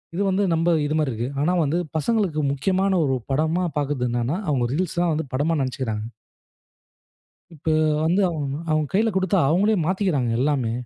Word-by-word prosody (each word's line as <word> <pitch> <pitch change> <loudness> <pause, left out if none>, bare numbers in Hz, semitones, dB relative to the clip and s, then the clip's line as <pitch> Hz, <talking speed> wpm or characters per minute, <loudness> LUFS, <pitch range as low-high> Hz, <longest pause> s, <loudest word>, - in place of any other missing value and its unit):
இது 190 - -1
வந்து, 190 +2 +1
நம்ம 165 +1 +2
இது 150 +1 -1
மாரி 150 -4 0
இருக்கு. 115 +2 -3
ஆனா 160 +5 +2
வந்து, 155 +3 0 0.2
பசங்களுக்கு 195 -3 0
முக்கியமான 190 +6 +1
ஒரு 135 -1 +1 0.2
படமா 160 +6 +1
பாக்குறது 140 -3 -1
என்னன்னா. 120 +6 -1
அவங்க 130 -5 +1
ரீல்ஸ் 175 +2 -1
தான் 175 -2 +2
வந்து 155 -1 -3
படமா 150 +5 +1
நெனைச்சுக்கிறாங்க. 125 -5 -3 1.5
இப்போ 160 +1 -2 0.3
வந்து, 180 +5 +2
அவங் 150 -4 -3 0.2
அவங்க 155 -1 +1
கையில 220 +4 +3
குடுத்தா, 190 0 +1
அவங்களே 200 +7 +3
மாத்திக்கிறாங்க 180 - 0
எல்லாமே. 130 -4 +1
155 Hz, 160 wpm, -23 LUFS, 135-185 Hz, 1.5 s, கையில